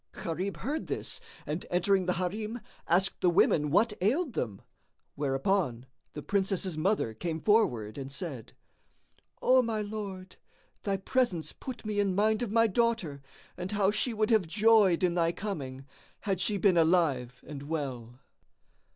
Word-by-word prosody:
Gharib 185 +4 -3
heard 300 +5 -3
this - - -3 0.3
and 155 +4 -3
entering 185 +1 +2
the 180 - +2
Harim, 210 +6 -3 0.3
asked 185 +3 +2
the 180 - +4
women 150 -3 +3
what 210 +8 +3
ailed 265 - +1
them, 105 - -3 0.5
whereupon 135 -2 0 0.3
the 150 - -7
Princess's 195 -3 0
mother 155 - 0
came 160 +7 -3
forward 125 - +2
and 135 0 -6
said, 135 - -6 0.9
"O 255 0 +6
my 225 -3 -1
lord, 200 -3 -6 0.4
thy 200 -2 -1
presence 195 -5 0
put 255 -4 -8
me 210 -1 -1
in 195 -2 +1
mind 215 +2 +2
of 240 - -1
my 230 +1 +4
daughter 220 - 0 0.3
and 180 +2 -5
how 200 -1 +3
she 215 +4 -1
would 215 0 0
have 215 -6 +4
joyed 210 -2 +4
in 175 -1 +3
thy 170 -1 +2
coming, 140 -9 -5 0.4
had 195 -4 -1
she 205 +1 0
been 185 -2 +3
alive 155 -8 +2
and 145 -3 -7
well." 135 -5 -5
185 Hz, 150 wpm, -30 LUFS, 155-215 Hz, 0.9 s, O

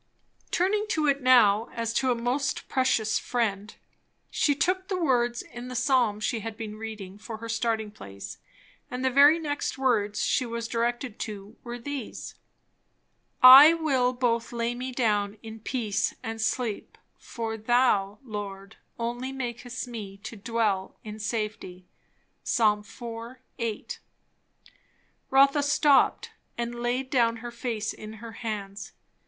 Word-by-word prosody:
Turning 415 +4 +1
to 315 -7 +1
it 280 -1 +2
now 230 -4 +5
as 230 -1 -2
to 260 +3 +1
a 245 - +3
most 245 +4 -1
precious 255 -5 +1
friend, 215 -4 -2 0.6
she 285 - +2
took 370 +5 0
the 380 - -1
words 240 -6 +1
in 240 +1 -9
the 250 - -7
psalm 250 -4 +2
she 225 +2 -1
had 220 0 -6
been 215 -2 -6
reading 215 -3 -8
for 220 +1 -7
her 230 +1 -8
starting 225 -1 -1
place. 100 - -10 0.5
And 250 +1 -3
the 260 - +2
very 285 +4 +7
first 330 - -7
next 290 -2 -2
words 215 -6 +1
she 260 - +2
was 230 -1 -4
directed 240 0 -2
to 210 0 -6
were 240 0 -6
these: 270 0 -6 1.1
"I 275 +6 +11
will 270 -6 +1
both 240 -2 0
lay 235 0 -1
me 255 +2 -5
down 210 -4 0
in 225 0 -9
peace, 210 -3 -1
and 225 0 -4
sleep; 220 -1 -2 0.2
for 225 -1 -5
thou, 220 -3 +2
Lord, 205 -2 -7 0.2
only 240 +3 -3
makest 250 -1 -5
me 210 -5 -7
to 230 - -7
dwell 210 -3 -1
in 215 0 -8
safety." 210 -5 -4 0.6
Ps. - - 0
iv. 210 +2 +1 0.6
8. 230 -3 -4 1.3
Rotha 275 +2 +5
stopped 285 0 +3 0.3
and 235 0 -3
laid 255 +2 -1
down 235 -3 +3
her 240 +1 -7
face 235 -3 -3
in 215 0 -9
her 225 +1 -9
hands. 210 -3 -6
235 Hz, 145 wpm, -27 LUFS, 215-255 Hz, 1.3 s, I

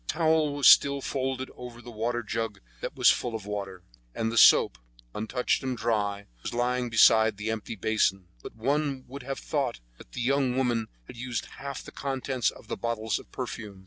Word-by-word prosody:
The - - -1
towel 155 -2 +2
was 145 - +4
still 140 0 +7
folded 130 -1 -3
over 125 -1 -9
the 120 0 -10
waterjug 115 -1 -2 0.2
that - - -5
was - - +6
full 120 -2 -2
of 110 -3 -6
water, 100 -3 -5 0.3
and 115 0 -1
the - - -4
soap, 60 - +6 0.3
untouched 110 +4 -1
and 130 -2 -3
dry, 105 -3 -1 0.2
was - - -5
lying 125 0 0
beside 110 -1 +5
the 110 +2 -2
empty 110 0 -5
basin; 95 -2 +1 0.2
but - - -10
one 135 +3 -1
would 140 +3 -8
have 135 +2 -5
thought 135 -6 -2 0.2
that - - -15
the 125 - -4
young 130 0 +1
woman 120 -4 +1 0.2
had 120 - -12
used 125 -1 -3
half 140 -1 -6
the - - -11
contents 135 -2 -1
of - - -13
the - - -4
bottles 110 -3 -2
of - - -16
perfume. 105 -4 -6
120 Hz, 190 wpm, -28 LUFS, 110-130 Hz, 0.3 s, still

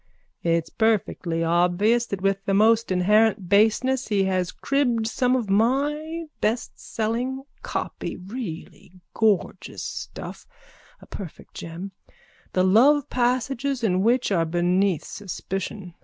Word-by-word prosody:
It's 165 -1 0
perfectly 195 -6 0
obvious 180 +8 +2
that 195 -1 -5
with 195 0 +1
the 195 - +1
most 225 +1 +4
inherent 205 +2 +3
baseness 225 +6 +3
he 205 -2 +2
has 185 -2 0
cribbed 250 -5 0
some 250 +2 +1
of 240 -5 -1
my 290 +10 0 0.2
bestselling 235 +3 -2 0.2
copy, - - -4
really 185 -4 -8 0.2
gorgeous 215 -4 0
stuff, - - -7 0.5
a - - -13
perfect 185 -7 -9
gem, 170 +4 -7 0.6
the 185 - +3
love 255 +9 +4
passages 255 +1 0
in 185 -4 +2
which 235 +2 +2
are 170 -4 +3
beneath 175 +2 +1
suspicion. 195 -1 -6
210 Hz, 115 wpm, -24 LUFS, 185-245 Hz, 0.6 s, most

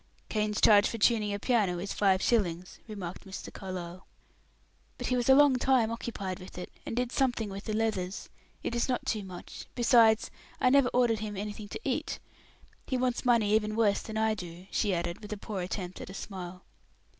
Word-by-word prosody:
"Kane's 210 -1 0
charge 205 -1 +6
for 230 - -4
tuning 215 -1 +3
a 200 - -1
piano 205 -5 +1
is 195 +3 -4
five 195 -2 +3
shillings," 180 -6 0
remarked 195 -5 -6
Mr. 195 -1 -8
Carlyle. 185 -1 -7 0.9
"But - - -5
he 250 - +1
was 245 0 0
a 265 - +9
long 285 -2 +6
time 250 -3 +3
occupied 200 -5 -4
with 185 - -11
it, 180 - -6 0.2
and - - -3
did 245 0 -1
something 245 -7 0
with 195 +1 -7
the 215 - -2
leathers. 210 -4 -1 0.4
It - - -2
is 235 +2 0
not 250 - -1
too 215 - -1
much; 185 -2 -9
besides 230 -3 +5 0.3
I 255 - +4
never 275 -2 +5
ordered 240 -3 +2
him 210 -2 -5
anything 210 +1 -5
to - - -6
eat. - - -2 0.7
He 260 - 0
wants 250 0 0
money 230 -4 +4
even 215 0 +2
worse 215 -3 +3
than 220 -1 -6
I 220 0 +2
do," 180 -3 -8
she 210 - +1
added, 170 -1 -2
with 210 - -9
a - - -5
poor 200 -1 -5
attempt 180 0 -5
at - - -8
a 190 - -8
smile. 180 -2 -7
210 Hz, 200 wpm, -30 LUFS, 190-235 Hz, 0.9 s, a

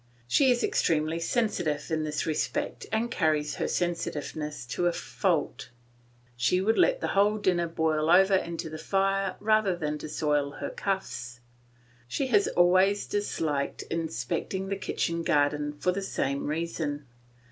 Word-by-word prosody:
She 265 - +4
is 245 -1 +2
extremely 160 +1 +1
sensitive 165 -7 -1
in 155 -1 0
this 150 -1 -2
respect 155 -2 -2
and 225 +2 0
carries 155 -3 0
her - - -1
sensitiveness 155 -4 -3
to 175 +8 -1
a - - +3
fault; - - -1 0.7
she 125 +9 +2
would 220 +4 +2
let - - +3
the - - -1
whole 205 +2 +3
dinner 180 -4 +1
boil 160 -1 0
over 190 +3 +6
into 170 -3 0
the 155 0 -7
fire 195 -1 0
rather 215 -3 +2
than 150 -3 -3
soil 150 -2 -1
her - - -5
cuffs. 155 -11 -3 0.7
She 275 - -1
has 205 -4 +4
always 185 +3 +3
disliked 155 -8 -2
inspecting 170 +3 -2
the 200 - 0
kitchen 170 -3 -2
garden 145 -1 +1
for 150 +5 0
the 195 +2 -3
same 140 -7 -2
reason. 150 -2 -3
170 Hz, 145 wpm, -28 LUFS, 150-195 Hz, 0.7 s, over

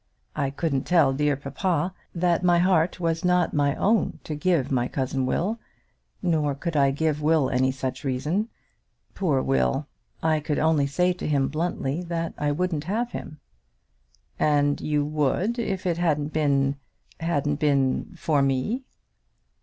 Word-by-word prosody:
I 140 -3 0
couldn't 140 -1 -1
tell 160 -7 +4
dear 145 +1 +1
papa 170 +5 -1 0.2
that 175 0 +1
my 175 -1 +4
heart 175 -1 +2
was 165 -1 -1
not 180 -1 +2
my 140 -1 +2
own 220 +2 +1
to 155 - -5
give 150 -2 +1
to - - -2
my 125 -1 +1
cousin 130 -1 -2
Will; 210 - -1 0.6
nor 155 -5 +1
could 165 +3 -4
I 140 -2 +4
give 150 +2 0
Will 155 -3 +2
any 130 +1 +2
such 130 -1 -4
reason. 150 - -1 0.6
Poor 150 -9 +1
Will! 65 -2 +1 0.4
I 160 -1 +2
could 150 0 -2
only 155 -3 +2
say 180 +6 +1
to 180 - -5
him 140 -3 +1
bluntly 155 -1 -2
that 170 -1 -3
I 150 0 +1
wouldn't 160 -1 -1
have 230 +6 -1
him." 150 - -8 1.0
"And 145 -1 +2
you 150 -1 0
would, 155 - 0
if 195 -5 -2
it 170 -2 0
hadn't 150 -3 0
been, 140 -2 +2 0.4
hadn't 145 -3 0
been 140 +2 +1
for 150 -4 +1
me." 135 - 0
150 Hz, 155 wpm, -25 LUFS, 140-175 Hz, 1.0 s, tell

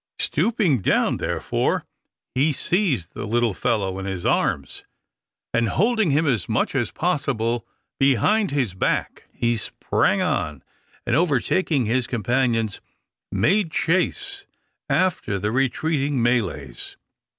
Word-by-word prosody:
Stooping 180 - +1
down, - - +2
therefore, - - -1 0.5
he 145 +4 +2
seized 155 - 0
the 105 - -5
little 120 0 +1
fellow 100 -4 -1
in 95 - -5
his 95 -2 -4
arms, - - 0 0.7
and, 115 -1 +2
holding 220 - +2
him 150 +3 +2
as 115 - 0
much 110 - 0
as 120 -6 0
possible 125 - -1 0.3
behind 140 - +3
his 130 -9 0
back, 95 - -1
he 120 0 0
sprang 110 - 0
on, 75 -3 -1 0.4
and - - +1
overtaking 155 -2 +2
his 120 +3 0
companions, 115 -2 0 0.5
made 175 - +2
chase 395 - 0 0.4
after 180 - +1
the 105 +2 -1
retreating 135 +2 0
Malays. 100 - -1
130 Hz, 115 wpm, -23 LUFS, 110-165 Hz, 0.7 s, behind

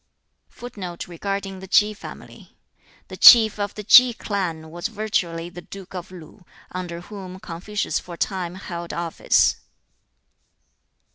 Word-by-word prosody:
[Footnote 190 -8 -8
4: 175 -1 -11 0.2
The 190 -1 -9
Chief 215 +1 +3
of 205 0 -3
the 210 - -7
Ki 245 +3 +8
clan 170 -8 -4
was 175 +4 -4
virtually 195 -6 -2
the 175 0 -10
Duke 195 +1 -12
of 180 -1 -7
Lu, 180 +1 -13 0.3
under 175 -2 -6
whom 185 -1 -9
Confucius 190 +5 -3
for 175 - -10
a - - -18
time 180 -2 -3
held 175 -3 -7
office. 170 -1 +1
185 Hz, 120 wpm, -23 LUFS, 170-205 Hz, 0.3 s, Ki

